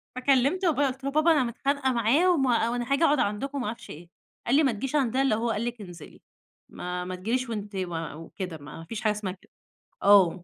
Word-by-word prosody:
فكلمت 275 +8 +2
بابايا 290 -4 +2
قُلت 265 +1 -6
له: 275 - -2
"بابا 310 +3 +4
أنا 295 -4 +4
متخانقة 265 +3 -1
معاه، 245 +10 +3
وما 250 -7 +2
وأنا 240 +2 -3
هاجي 300 +4 +2
أقعد 295 -3 +4
عندكم،" 260 +8 -1
وما 250 -5 -2
أعرفش 230 +2 -7
إيه. 170 +3 -10 0.4
قال 245 - +3
لي 310 - +5
ما 270 - +3
تجيش 250 +6 -4
عندنا 265 -2 +2
إلا 270 - +2
لو 215 - +2
هو 235 +1 -1
قال 220 +3 -2
لِك 240 -2 -4
انزلي 175 -5 -11 0.5
ما 180 0 -5
ما 185 0 -4
تيجيليش 235 +7 -2
وأنتِ 205 -2 -5
ما 170 -5 -4
وكده 165 +2 -7
ما 145 +2 -10
فيش 230 +5 -6
حاجة 215 - +2
اسمها 205 -3 -3
كده 185 - -22 0.5
آه. 190 -3 +5
235 Hz, 225 wpm, -27 LUFS, 195-275 Hz, 0.5 s, لي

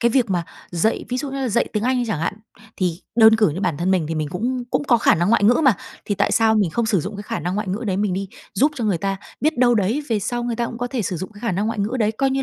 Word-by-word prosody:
cái 235 0 +3
việc 235 -5 +2
mà 175 -2 0 0.3
dạy 175 +6 0
ví 250 - -2
dụ 270 +1 -3
như 275 - -5
là 260 - 0
dạy 235 +2 +1
tiếng 210 -1 -1
Anh 255 +1 +1
đi 245 - 0
chẳng 200 -8 -2
hạn, 165 - -1 0.4
thì 180 -2 -1 0.2
đơn 220 -1 +7
cử 215 -5 +4
như 165 +6 -4
bản 160 - 0
thân 175 +5 0
mình 180 -5 +2
thì 165 - -2
mình 155 -1 -2
cũng 245 +6 -2
cũng 265 +3 0
có 240 -4 +4
khả - - +4
năng 175 +2 +1
ngoại 205 - +3
ngữ 240 - +6
mà, 260 -6 +6 0.3
thì 205 - -1
tại - - +1
sao 225 -1 +4
mình 200 -6 +2
không 230 +5 0
sử 205 -6 +2
dụng 200 +6 -6
cái 205 - -6
khả 225 +2 -4
năng 180 +1 -2
ngoại 210 -1 -2
ngữ 210 +6 -3
đấy 190 -1 0
mình 205 -2 0
đi 195 +1 -3 0.3
giúp 290 +4 +3
cho 240 -5 -3
người 195 -6 +1
ta? 195 +1 -1 0.2
Biết 310 -3 +1
đâu 240 -1 +5
đấy, 220 +8 +1
về 220 -2 +1
sau 240 +4 -2
người 235 -2 -2
ta 235 - 0
cũng 230 - -7
có 245 - -2
thể 245 -2 -2
sử 185 -1 -2
dụng 185 +5 -6
cái 205 - -14
khả 230 -5 -1
năng 200 +4 0
ngoại 225 0 -2
ngữ 215 +6 -1
đấy, 215 0 +2
coi 270 +4 0
như 270 0 0
220 Hz, 340 wpm, -21 LUFS, 190-240 Hz, 0.4 s, đơn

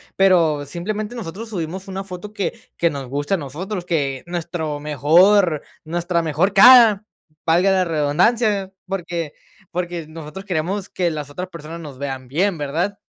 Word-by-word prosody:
Pero 170 -6 +3
simplemente 210 - -4
nosotros 220 +1 -6
subimos 185 0 -5
una 195 0 -4
foto 195 +2 -8
que 200 -5 -2 0.2
que 170 - +3
nos 140 -2 -6
guste 145 +7 -2
a - - +3
nosotros, 175 +6 -5
que 140 -6 -1
nuestro 165 -3 -3
mejor 155 +4 +4 0.2
nuestra 170 +1 -1
mejor 165 +5 +1
cara, 225 -1 +8 0.4
valga 175 +4 +4
la 190 -1 +3
redundancia, 190 +7 +1
porque 175 -5 -4 0.4
porque 175 -2 -3
nosotros 160 +4 -9
queremos 185 +2 -2
que 180 -2 0
las 150 -3 -5
otras 180 +5 -5
personas 165 -1 -8
nos 150 -5 -9
vean 135 -2 -5
bien, 175 +7 0
¿verdad? 165 +8 -2
175 Hz, 150 wpm, -21 LUFS, 155-195 Hz, 0.4 s, cara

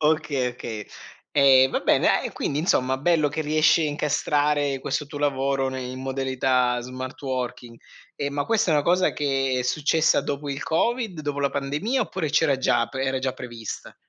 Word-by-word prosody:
Okay, 150 -4 +1
okay. 110 -3 -7 0.5
Ehm, 135 -2 +6
va - - -1
bene, - - +3
a - - +2
e - - -4
quindi 145 - -2
insomma 130 -5 +1
bello 155 -1 +2
che 155 +2 -4
riesci 155 +2 +3
a 150 - +1
incastrare 145 -1 0
questo 140 +2 -2
tuo 145 0 -8
lavoro 135 -1 0
ne 130 0 -4
in 130 +1 -6
modalità 130 -2 0
smart 130 +1 -7
working. 125 -3 -4 0.4
Ehm, 140 0 -3
ma 145 - -1
questa 225 -5 +1
è - - +4
una 145 - +3
cosa 180 +3 +2
che 135 -2 0
è - - -1
successa 155 +5 +2
dopo 145 0 -4
il 140 +1 -4
covid, 205 +2 -1
dopo 145 -1 -3
la 140 - +1
pandemia 150 - -1
oppure 160 -6 -3
c'era 145 -3 +3
già, 130 - +2
pre 135 0 -3
era 130 0 0
già 130 0 -2
prevista? 120 -3 -8
140 Hz, 185 wpm, -24 LUFS, 130-150 Hz, 0.5 s, Ehm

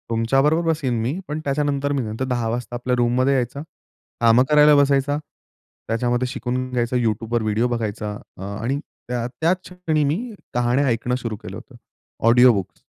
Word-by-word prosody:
तुमच्याबरोबर 135 +8 +2
बसेल 150 -5 0
मी 130 +10 -2
पण 150 +1 -3
त्याच्यानंतर 145 0 0
मी 140 - 0
नंतर 110 +4 -3
10 120 -3 -1
वाजता 120 +1 -4
आपल्या 125 +1 -1
रूममध्ये 125 +3 +2
यायचं 130 +2 -1 0.6
कामं 115 +2 +6
करायला 150 0 +6
बसायचं, 140 0 +3 0.7
त्याच्यामध्ये 120 +2 0
शिकून 130 -1 -3
घ्यायचा 120 0 -1
YouTubeवर 115 0 0
व्हिडिओ 110 +3 +1
बघायचा 110 -3 -3 0.3
अ, - - -11
आणि 110 +8 -3 0.3
त्याच 125 +9 0
क्षणी 165 -4 -1
मी 145 +3 +1 0.4
कहाण्या 120 +3 +2
ऐकणं 120 +1 0
सुरू 115 -3 -4
केलं - - -9
होतं. - - -14 0.5
ऑडिओबुक्स. 115 -5 +4
125 Hz, 150 wpm, -22 LUFS, 115-140 Hz, 0.7 s, कामं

